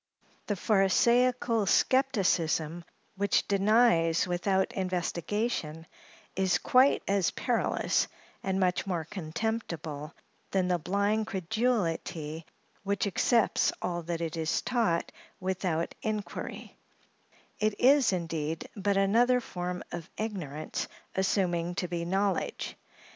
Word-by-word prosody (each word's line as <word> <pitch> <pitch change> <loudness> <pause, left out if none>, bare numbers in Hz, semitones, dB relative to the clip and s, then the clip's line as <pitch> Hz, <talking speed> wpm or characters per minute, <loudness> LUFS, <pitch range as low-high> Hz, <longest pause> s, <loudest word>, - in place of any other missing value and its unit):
The 205 - 0
pharisaical 230 +3 +3
skepticism 180 - +2 0.3
which 200 0 +1
denies 200 -5 +3
without 190 +2 0
investigation, 180 -2 -2 0.5
is 190 -1 +2
quite 260 +2 +4
as 195 -3 +2
perilous, - - 0 0.3
and 190 0 -1
much 185 0 +1
more 170 -4 -1
contemptible, 165 -5 -4 0.3
than 185 -2 +1
the 175 -1 +2
blind 200 +5 0
credulity 175 -6 -1 0.3
which 200 +1 -1
accepts 220 +3 +2
all 175 -1 -2
that 170 0 -4
it 165 -1 -3
is 160 0 0
taught 225 -9 0 0.3
without 185 -3 -1
inquiry; 215 -1 -5 0.8
it 215 -1 0
is, 270 -2 +5
indeed, 165 -3 -3
but 200 -1 0
another 235 +6 +4
form 180 -5 -5
of 170 -2 -6
ignorance 175 -9 -4 0.3
assuming 180 -3 0
to 180 - -2
be 170 -1 -3
knowledge. 195 +1 -1
190 Hz, 105 wpm, -29 LUFS, 170-215 Hz, 0.8 s, is